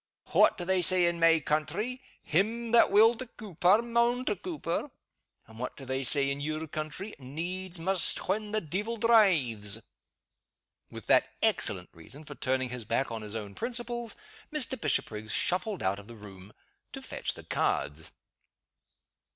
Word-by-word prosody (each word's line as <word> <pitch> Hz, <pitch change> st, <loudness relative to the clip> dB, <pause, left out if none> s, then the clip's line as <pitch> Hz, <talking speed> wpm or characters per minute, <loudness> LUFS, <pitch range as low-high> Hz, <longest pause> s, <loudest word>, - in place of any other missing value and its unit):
What -, -, +5 dB
do 175 Hz, -, -5 dB
they 190 Hz, 0 st, +2 dB
say 180 Hz, +1 st, +3 dB
in 170 Hz, 0 st, 0 dB
my 165 Hz, -1 st, +5 dB
country? 210 Hz, -, -2 dB, 0.2 s
'Him 225 Hz, +8 st, 0 dB
that 235 Hz, -, +6 dB
will 220 Hz, +3 st, +6 dB
to 255 Hz, -, -5 dB
Coupar, 200 Hz, 0 st, +2 dB
maun 235 Hz, +1 st, +1 dB
to 210 Hz, -, 0 dB
Coupar.' 295 Hz, -, -4 dB, 0.6 s
And 110 Hz, 0 st, -15 dB
what 125 Hz, -, -5 dB
do 135 Hz, -, -9 dB
they 130 Hz, +1 st, -2 dB
say 140 Hz, +1 st, +1 dB
in 140 Hz, +1 st, -4 dB
your 155 Hz, +2 st, -3 dB
country? 155 Hz, +7 st, -5 dB
'Needs 175 Hz, +7 st, -5 dB
must 185 Hz, +2 st, +1 dB
when 210 Hz, +2 st, -1 dB
the 215 Hz, 0 st, 0 dB
deevil 205 Hz, +9 st, -3 dB
drives.'" 150 Hz, -, +3 dB, 1.1 s
With -, -, -10 dB
that -, -, +4 dB, 0.2 s
excellent -, -, +1 dB
reason 130 Hz, -, -10 dB
for 145 Hz, -, -9 dB
turning 130 Hz, -2 st, -1 dB
his 125 Hz, -1 st, -4 dB
back 115 Hz, +4 st, -1 dB
on 115 Hz, -1 st, -4 dB
his 105 Hz, 0 st, -6 dB
own 105 Hz, -3 st, -5 dB
principles, 240 Hz, -, -2 dB, 0.4 s
Mr. 265 Hz, -5 st, +1 dB
Bishopriggs 110 Hz, -, -1 dB
shuffled 185 Hz, -, 0 dB
out 95 Hz, +2 st, 0 dB
of 100 Hz, -, -13 dB
the 120 Hz, -, -11 dB
room 100 Hz, -2 st, -12 dB, 0.4 s
to -, -, -6 dB
fetch -, -, -2 dB
the -, -, -10 dB
cards. 75 Hz, +3 st, -1 dB
170 Hz, 160 wpm, -29 LUFS, -, 1.1 s, that